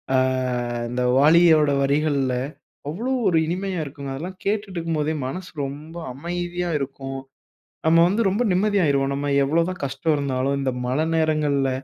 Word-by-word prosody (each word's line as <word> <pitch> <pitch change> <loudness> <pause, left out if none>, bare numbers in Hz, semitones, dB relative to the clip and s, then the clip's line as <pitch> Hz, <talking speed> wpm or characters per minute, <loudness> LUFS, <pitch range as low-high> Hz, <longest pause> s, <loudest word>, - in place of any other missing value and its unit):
ஆ - - +5 0.7
இந்த 125 +1 -2 0.2
வாலியோட 155 0 +6
வரிகள்ல 140 -2 +1 0.5
அவ்ளோ 225 - -3 0.2
ஒரு 170 - +2
இனிமையாக 185 0 -2
இருக்குங்க. 140 -1 -7
அதெல்லாம் 180 +6 -7
கேட்டுட்டு 205 -1 -1
இருக்கும்போதே 160 -2 -1
மனசு 180 +7 -6 0.2
ரொம்ப 150 +4 -8 0.2
அமைதியா 175 +4 -3
இருக்கும். 135 0 -5 0.7
நம்ம 165 +1 +5
வந்து 205 +5 +1
ரொம்ப 205 +6 0
நிம்மதியாயிருவோம். 180 -9 +2
நம்ம 140 +1 -2
எவ்ளோ 160 +4 +2
தான் 185 - -6
கஷ்டம் 155 +4 -1
இருந்தாலும் 140 0 -1
இந்த 135 -1 0
மழை 135 +6 0
நேரங்கள்ல, 150 -4 +1
155 Hz, 135 wpm, -23 LUFS, 140-175 Hz, 0.7 s, வாலியோட